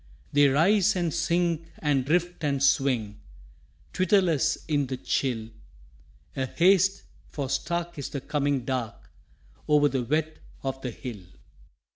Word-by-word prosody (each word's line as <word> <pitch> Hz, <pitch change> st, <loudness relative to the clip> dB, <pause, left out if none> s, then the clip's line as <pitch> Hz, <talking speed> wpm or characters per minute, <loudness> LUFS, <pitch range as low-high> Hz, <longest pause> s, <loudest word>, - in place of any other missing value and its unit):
They 145 Hz, 0 st, +6 dB
rise 190 Hz, +9 st, +3 dB
and 175 Hz, -3 st, -1 dB
sink 170 Hz, -1 st, 0 dB
and 145 Hz, -4 st, +1 dB
drift 175 Hz, +4 st, 0 dB
and 140 Hz, -2 st, 0 dB
swing, 125 Hz, -7 st, +1 dB, 0.7 s
Twitterless 180 Hz, -5 st, +2 dB
in 145 Hz, -3 st, +1 dB
the 130 Hz, 0 st, -4 dB
chill; 120 Hz, -4 st, -2 dB, 0.9 s
A 130 Hz, -1 st, -1 dB
haste, 190 Hz, +5 st, +3 dB, 0.3 s
for 140 Hz, -3 st, -4 dB
stark 170 Hz, +3 st, -2 dB
is 140 Hz, -, -4 dB
the 140 Hz, -, -4 dB
coming 140 Hz, -3 st, -1 dB
dark 125 Hz, -4 st, -4 dB, 0.6 s
Over 150 Hz, -1 st, +4 dB
the 135 Hz, -2 st, -1 dB
wet 155 Hz, +5 st, -1 dB, 0.3 s
of 135 Hz, 0 st, -4 dB
the 125 Hz, -, -3 dB
hill. 115 Hz, -3 st, -8 dB
145 Hz, 130 wpm, -26 LUFS, 135-170 Hz, 0.9 s, They